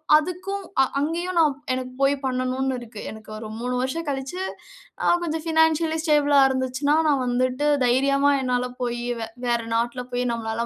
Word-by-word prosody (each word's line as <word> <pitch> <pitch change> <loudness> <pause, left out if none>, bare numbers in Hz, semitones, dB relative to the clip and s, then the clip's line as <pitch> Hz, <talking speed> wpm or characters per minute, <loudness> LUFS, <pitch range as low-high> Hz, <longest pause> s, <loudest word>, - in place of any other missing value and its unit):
அதுக்கும் 365 +5 -1 0.2
அ - - +7 0.2
அங்கயும் 340 +5 -2
நான் 305 -3 +4 0.2
எனக்கு 255 0 -4
போய் 275 +1 +4
பண்ணணும்ன்னு 255 +1 -1
இருக்கு. 230 -3 -9
எனக்கு 220 0 -12
ஒரு 220 0 -7
3 250 +1 -2
வருஷம் 320 +6 -2
கழிச்சு 270 +6 -4 0.6
அ - - +4
கொஞ்சம் 320 -1 -2
பினான்சியலி 320 0 +3
ஸ்டேபிள்ளா 295 -3 +4
இருந்துச்சுன்னா, 260 +3 0
நான் 280 -3 +2
வந்துட்டு 255 +3 0 0.2
தைரியமா 275 +3 +3
என்னால 250 -1 0
போய் 240 -1 -2 0.2
வே 225 - -3 0.2
வேற 235 -1 +2
நாட்ல 240 +2 -1
போய் 245 0 0
நம்மலால 225 0 -2
265 Hz, 160 wpm, -24 LUFS, 245-305 Hz, 0.6 s, அ